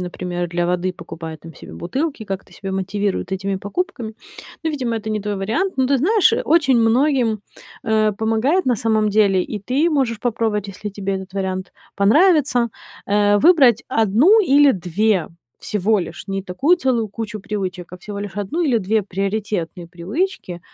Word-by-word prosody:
например, 175 Hz, -1 st, -4 dB
для 175 Hz, 0 st, -1 dB
воды 180 Hz, +1 st, 0 dB
покупают 160 Hz, -2 st, -9 dB
там 165 Hz, -1 st, -12 dB
себе -, -, -12 dB
бутылки, 265 Hz, -, -3 dB
как-то 195 Hz, -1 st, -6 dB
себя 195 Hz, -1 st, -6 dB
мотивируют 195 Hz, 0 st, -2 dB
этими 195 Hz, +1 st, -2 dB
покупками. 220 Hz, -, -4 dB, 0.5 s
Ну, 320 Hz, -, 0 dB
видимо, 250 Hz, -6 st, -2 dB
это 220 Hz, 0 st, -5 dB
не 215 Hz, -1 st, -1 dB
твой 205 Hz, 0 st, -3 dB
вариант. 225 Hz, -, -1 dB
Но 260 Hz, -1 st, +2 dB
ты 275 Hz, 0 st, +2 dB
знаешь, 405 Hz, -, +3 dB
очень 290 Hz, -6 st, +3 dB
многим, 235 Hz, -2 st, +2 dB, 0.4 s
э, 215 Hz, -1 st, +2 dB
помогает, 225 Hz, -, +1 dB
на 245 Hz, -3 st, +2 dB
самом 215 Hz, 0 st, +1 dB
деле, 200 Hz, -3 st, +3 dB
и 210 Hz, -, -5 dB
ты 275 Hz, -, +1 dB
можешь 255 Hz, -8 st, 0 dB
попробовать, 220 Hz, -4 st, -1 dB
если 200 Hz, +2 st, -6 dB
тебе 195 Hz, -1 st, -3 dB
этот 190 Hz, 0 st, -7 dB
вариант 190 Hz, -1 st, -3 dB, 0.2 s
понравится, 260 Hz, -, +4 dB, 0.4 s
э, 205 Hz, 0 st, +3 dB
выбрать 275 Hz, -, +5 dB
1 230 Hz, -, +4 dB
или 285 Hz, -3 st, +5 dB
2 185 Hz, +1 st, 0 dB, 0.3 s
всего 210 Hz, +1 st, 0 dB
лишь, 170 Hz, +2 st, -7 dB
не 195 Hz, 0 st, -3 dB
такую 270 Hz, -, +2 dB
целую 245 Hz, -8 st, 0 dB
кучу 215 Hz, +1 st, -6 dB
привычек, 185 Hz, -4 st, -5 dB
а -, -, -7 dB
всего 205 Hz, +1 st, -7 dB
лишь 205 Hz, -1 st, -5 dB
1 205 Hz, -, -2 dB
или 255 Hz, -7 st, +2 dB
2 215 Hz, +2 st, 0 dB
приоритетные 195 Hz, -3 st, -3 dB
привычки, 180 Hz, -, -4 dB
210 Hz, 165 wpm, -20 LUFS, 190-255 Hz, 0.5 s, выбрать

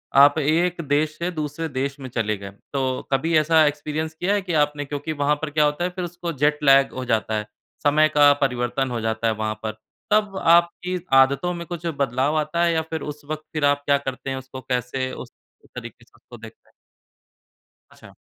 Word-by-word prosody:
आप 145 Hz, +2 st, +7 dB
एक 170 Hz, +4 st, +1 dB
देश 150 Hz, +2 st, +1 dB
से 170 Hz, +2 st, -2 dB
दूसरे 155 Hz, 0 st, -4 dB
देश 140 Hz, +1 st, -3 dB
में 130 Hz, -, -7 dB
चले 110 Hz, -3 st, -1 dB
गए। 100 Hz, 0 st, -9 dB, 0.2 s
तो 130 Hz, -2 st, -1 dB
कभी 160 Hz, +5 st, +1 dB
एक्सपीरियंस 155 Hz, 0 st, +1 dB
किया 175 Hz, +5 st, -1 dB
है 205 Hz, -, +1 dB
कि 180 Hz, -2 st, -4 dB
आपने 145 Hz, 0 st, -4 dB
क्योंकि 145 Hz, +2 st, -4 dB
वहाँ 145 Hz, +1 st, +3 dB
पर 160 Hz, -, -2 dB
क्या 150 Hz, 0 st, +2 dB
होता 150 Hz, +3 st, 0 dB
है, 180 Hz, -, 0 dB
फिर 180 Hz, 0 st, -5 dB
उसको 175 Hz, 0 st, -5 dB
जेट 150 Hz, 0 st, +3 dB
लैग 135 Hz, -1 st, +5 dB
हो 130 Hz, 0 st, -5 dB
जाता 110 Hz, -2 st, 0 dB
है, 105 Hz, -, -3 dB, 0.4 s
समय 155 Hz, +1 st, +4 dB
का 145 Hz, -1 st, +6 dB
परिवर्तन 125 Hz, 0 st, 0 dB
हो 120 Hz, -2 st, -2 dB
जाता 110 Hz, +1 st, -1 dB
है 110 Hz, -, +2 dB
वहाँ 110 Hz, 0 st, -3 dB
पर। 110 Hz, -, -2 dB, 0.4 s
तब 210 Hz, -2 st, +2 dB
आपकी 170 Hz, +2 st, +3 dB, 0.2 s
आदतों 135 Hz, +6 st, +4 dB
में 170 Hz, -1 st, -6 dB
कुछ 175 Hz, -2 st, -6 dB
बदलाव 140 Hz, -2 st, 0 dB
आता 155 Hz, +3 st, 0 dB
है, 170 Hz, -1 st, +3 dB
या 160 Hz, -, +1 dB
फिर 160 Hz, 0 st, -5 dB
उस 150 Hz, 0 st, -7 dB
वक़्त 155 Hz, +1 st, -5 dB
फिर 155 Hz, -2 st, 0 dB
आप 145 Hz, 0 st, +2 dB
क्या 140 Hz, 0 st, +4 dB
करते 135 Hz, -1 st, -6 dB
हैं, 135 Hz, -, -2 dB
उसको 130 Hz, 0 st, -9 dB
कैसे 125 Hz, +1 st, -2 dB
उस -, -, -9 dB, 0.4 s
तरीक़े -, -, -9 dB
से -, -, -32 dB
उसको -, -, -14 dB
देखते -, -, -14 dB
हैं? -, -, -29 dB, 1.2 s
अच्छा। -, -, -16 dB
145 Hz, 205 wpm, -23 LUFS, 130-160 Hz, 1.2 s, आप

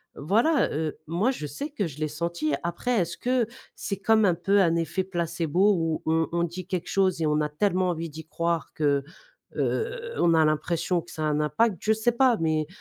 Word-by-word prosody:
voilà 230 Hz, -, +2 dB
heu, 155 Hz, 0 st, -2 dB
moi 190 Hz, +11 st, +1 dB
je 155 Hz, -, -5 dB
sais 215 Hz, -, -5 dB
que 210 Hz, -, -2 dB
je 150 Hz, 0 st, -10 dB
l'ai 155 Hz, -, 0 dB
senti. 155 Hz, 0 st, -2 dB
Après, 175 Hz, +8 st, -2 dB
est-ce 170 Hz, -1 st, -2 dB
que 250 Hz, -2 st, +1 dB, 0.3 s
c'est 200 Hz, -, -4 dB
comme 220 Hz, +2 st, +3 dB
un 180 Hz, -3 st, +3 dB
peu 195 Hz, +4 st, +2 dB
un 170 Hz, -3 st, +3 dB
effet 170 Hz, +3 st, -1 dB
placebo 175 Hz, +1 st, +1 dB
où 165 Hz, -3 st, -1 dB
on 160 Hz, 0 st, +2 dB
on 170 Hz, 0 st, 0 dB
dit 175 Hz, +1 st, -5 dB
quelque 185 Hz, -2 st, -3 dB
chose 185 Hz, -4 st, +1 dB
et -, -, +2 dB
on 150 Hz, 0 st, +2 dB
a 150 Hz, -, -1 dB
tellement 185 Hz, +3 st, +1 dB
envie 165 Hz, -1 st, -3 dB
d'y 160 Hz, +1 st, -9 dB
croire 170 Hz, 0 st, -2 dB
que, 140 Hz, -2 st, +1 dB, 0.5 s
heu, 475 Hz, +1 st, -2 dB
on 170 Hz, -1 st, +3 dB
a 160 Hz, -1 st, +5 dB
l'impression 170 Hz, +3 st, 0 dB
que 170 Hz, -, -15 dB
ça 155 Hz, -, -4 dB
a -, -, +1 dB
un 150 Hz, -1 st, +1 dB
impact? 175 Hz, +8 st, +1 dB
Je 220 Hz, -, +2 dB
sais 220 Hz, +2 st, +1 dB
pas, 245 Hz, 0 st, +3 dB
mais, 155 Hz, -2 st, 0 dB
170 Hz, 215 wpm, -26 LUFS, 155-200 Hz, 0.5 s, a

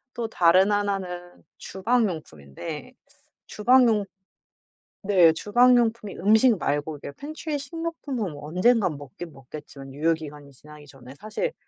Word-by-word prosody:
또 235 Hz, -2 st, -3 dB
다른 185 Hz, +1 st, +4 dB
1 205 Hz, -1 st, +1 dB
는 180 Hz, -1 st, -9 dB
주방 220 Hz, +3 st, 0 dB
용품인데 155 Hz, -, -8 dB, 0.5 s
주방 250 Hz, +4 st, +4 dB
용 210 Hz, -2 st, +1 dB, 1.0 s
네 180 Hz, -5 st, +6 dB
주방 245 Hz, +8 st, +4 dB
용품이 225 Hz, -3 st, -1 dB
음식 220 Hz, +4 st, +4 dB
말고 145 Hz, 0 st, -2 dB
이게 140 Hz, -, -8 dB
팬트리 300 Hz, -, -6 dB
식료품은 290 Hz, -, -5 dB
뭐 145 Hz, 0 st, -9 dB
언젠가 190 Hz, +5 st, +2 dB
먹긴 145 Hz, +3 st, -9 dB
먹겠지만 135 Hz, 0 st, -11 dB
유효기간이 150 Hz, -1 st, -3 dB
지나기 150 Hz, +2 st, -15 dB
전에 135 Hz, -2 st, -14 dB
사실 215 Hz, -, -3 dB
185 Hz, 280 characters per minute, -25 LUFS, 150-230 Hz, 1.0 s, 네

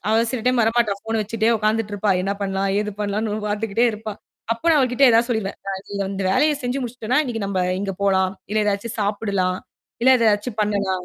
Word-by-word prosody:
அவ 220 Hz, -, +3 dB
சில 255 Hz, -3 st, -2 dB
டைம் 250 Hz, -1 st, +3 dB
வர 225 Hz, -, +3 dB
மாட்டா. 225 Hz, -4 st, +3 dB
ஃபோன 225 Hz, 0 st, -2 dB
வச்சுக்ட்டே 220 Hz, +2 st, 0 dB
உக்காந்துட்டு 215 Hz, 0 st, 0 dB
இருப்பா. 205 Hz, 0 st, 0 dB
என்ன 195 Hz, +1 st, 0 dB
பண்ணலாம், 195 Hz, 0 st, -1 dB
ஏது 210 Hz, 0 st, -3 dB
பண்ணலாம்னு 210 Hz, +1 st, -1 dB, 0.2 s
பாத்துகிட்டே 215 Hz, +2 st, 0 dB
இருப்பா. 215 Hz, 0 st, -6 dB, 0.4 s
அப்ப 230 Hz, -, -17 dB
நான் 305 Hz, -, +5 dB
அவகிட்ட 255 Hz, +2 st, 0 dB
ஏதாவது 230 Hz, +2 st, +3 dB
சொல்லிருவேன். 220 Hz, -4 st, -2 dB
நான் 190 Hz, -1 st, -3 dB
இது 200 Hz, 0 st, -1 dB
அந்த 195 Hz, 0 st, -3 dB
வேலையைச் 295 Hz, +3 st, +2 dB
செஞ்சு 250 Hz, +2 st, -1 dB
முடிச்சிட்டன்னா, 245 Hz, +1 st, -1 dB
இன்னைக்கு 225 Hz, -5 st, -3 dB
நம்ப 190 Hz, -2 st, -1 dB, 0.2 s
இங்க 195 Hz, -1 st, -2 dB
போலாம், 190 Hz, -1 st, +2 dB, 0.2 s
இல்ல 215 Hz, 0 st, +2 dB
எதாச்சும் 205 Hz, +2 st, -2 dB
சாப்பிடலாம், 200 Hz, -3 st, 0 dB, 0.4 s
இல்ல 260 Hz, +1 st, +7 dB
எதாச்சும் 215 Hz, 0 st, +1 dB
பண்ணலாம். 200 Hz, -3 st, -1 dB
210 Hz, 195 wpm, -22 LUFS, 200-230 Hz, 0.4 s, இல்ல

